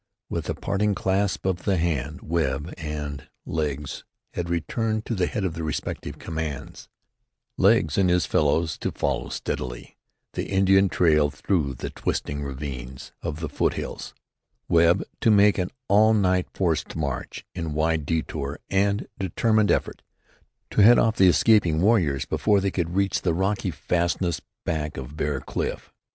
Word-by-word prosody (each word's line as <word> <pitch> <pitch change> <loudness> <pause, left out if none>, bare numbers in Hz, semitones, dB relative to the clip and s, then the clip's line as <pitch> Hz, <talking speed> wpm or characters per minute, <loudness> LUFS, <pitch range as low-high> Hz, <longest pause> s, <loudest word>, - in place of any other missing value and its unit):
With - - -3
a - - -1
parting 100 +1 0
clasp 95 0 0
of 95 -2 +1
the 100 -3 +1
hand 80 -3 -1
Webb 80 -1 -1
and 75 -3 -5 0.2
"Legs" 75 -3 -3 0.3
had 85 -1 -3
returned 110 - -1
to - - -2
the 90 -4 +1
head 105 - -3
of 90 -4 -1
their 80 0 -5
respective 75 - -4
commands, 80 -4 -5 0.7
"Legs" 95 -5 +3
and 95 -2 +3
his 90 -4 +3
fellows 80 +3 +1
to - - -2
follow 65 -3 -2
steadily 60 -1 -5 0.4
the - - -4
Indian 95 0 +4
trail 75 -5 +3
through 75 -2 -1
the - - -5
twisting 70 0 -3
ravines 65 -2 -6
of 75 +1 -4
the 80 - -2
foothills; - - -3 0.5
Webb 85 +2 +4 0.2
to - - +3
make 105 -1 +5
an 90 - -1 0.2
all 110 +2 +5
night 95 -3 +2
forced 85 -5 -1
march, 70 -6 -4
in 80 -4 -4
wide 80 -1 +1
détour 75 -3 -2
and 100 +2 +1
determined 105 +3 +2
effort, - - 0 0.7
to - - +3
head 120 +4 +8
off 115 -1 +2
the 95 -1 +7
escaping 90 -5 +4
warriors 85 - +2
before 105 -2 +2
they 95 0 0
could 85 -1 -2
reach 100 0 +1
the 85 -3 +1
rocky 95 +3 0
fastnesses 85 -1 -1 0.2
back 75 -2 -2
of 75 - -7
Bear 75 -3 -1
Cliff. - - -4
85 Hz, 155 wpm, -25 LUFS, 75-100 Hz, 0.7 s, head